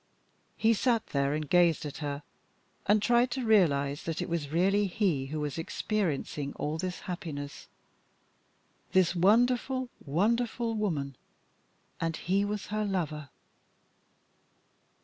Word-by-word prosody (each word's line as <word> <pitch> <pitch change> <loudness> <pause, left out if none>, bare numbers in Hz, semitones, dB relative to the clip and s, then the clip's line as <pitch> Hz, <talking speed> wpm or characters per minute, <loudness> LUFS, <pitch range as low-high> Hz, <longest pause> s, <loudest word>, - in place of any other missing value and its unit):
He 225 +1 +4
sat 230 +1 +1
there, 140 +1 +1
and 155 -1 -3
gazed 170 -1 +3
at 145 - -6
her, 145 -1 -4 0.6
and 210 +1 +4
tried 240 +1 +4
to 250 0 -3
realise 145 -9 +3
that 165 -1 -4
it 180 - -3
was 165 -4 -2
really 195 +6 +2
he 175 -8 0
who 155 +2 -4
was 150 +1 -3
experiencing 160 -6 -2
all 155 +2 -3
this 180 0 -3
happiness. 150 -5 -6 1.3
This 185 -2 +4
wonderful, 245 +7 +3
wonderful 230 - 0
woman 155 - -2 0.8
and 165 -1 -1
he 195 +3 +1
was 205 0 -3
her 215 0 0
lover. 160 -8 -2
180 Hz, 125 wpm, -30 LUFS, 150-215 Hz, 1.3 s, He